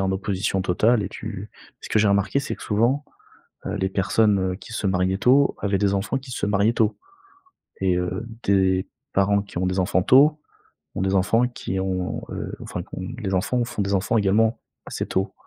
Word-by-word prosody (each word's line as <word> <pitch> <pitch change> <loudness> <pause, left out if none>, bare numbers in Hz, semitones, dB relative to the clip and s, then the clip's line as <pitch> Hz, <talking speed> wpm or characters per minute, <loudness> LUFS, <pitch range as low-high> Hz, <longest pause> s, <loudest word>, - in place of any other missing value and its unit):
en 95 0 +1
opposition 95 0 -1
totale 105 +5 +2
et 95 - -3
tu 105 -2 -7 0.3
ce - - -9
que - - +2
j'ai 105 -1 +4
remarqué, 100 +7 +2
c'est 140 - -4
que - - -12
souvent, 120 +7 +1 0.6
heu, - - -3
les 95 0 -1
personnes, 95 0 +2
heu, - - -5
qui 115 - -13
se 105 - -3
mariaient 95 0 +1
tôt 135 +5 +4
avaient 100 -1 0
des 100 -1 +2
enfants 100 +7 -1
qui 130 0 -14
se 110 - -2
mariaient 105 +2 +2
tôt, 110 -2 +1 0.8
et 90 -2 +2
heu, 90 +5 -3 0.2
des 95 -1 +2 0.3
parents 100 +1 +3
qui 100 - -9
ont 95 - 0
des 90 +1 0
enfants 90 0 +1
tôt, 150 +4 +5 0.6
ont - - -1
des 95 0 +1
enfants 115 +6 +3
qui 95 -6 -4
ont, 95 -1 -2
heu, - - -5
enfin - - -5
qui - - -17
ont 95 - -5 0.2
les 95 -5 -2
enfants 120 +7 +1
font 105 - -3
des 100 0 -1
enfants 100 +4 +1
également 110 +3 +2 0.3
assez - - -4
tôt. 95 +1 -1
100 Hz, 205 wpm, -23 LUFS, 95-110 Hz, 0.8 s, tôt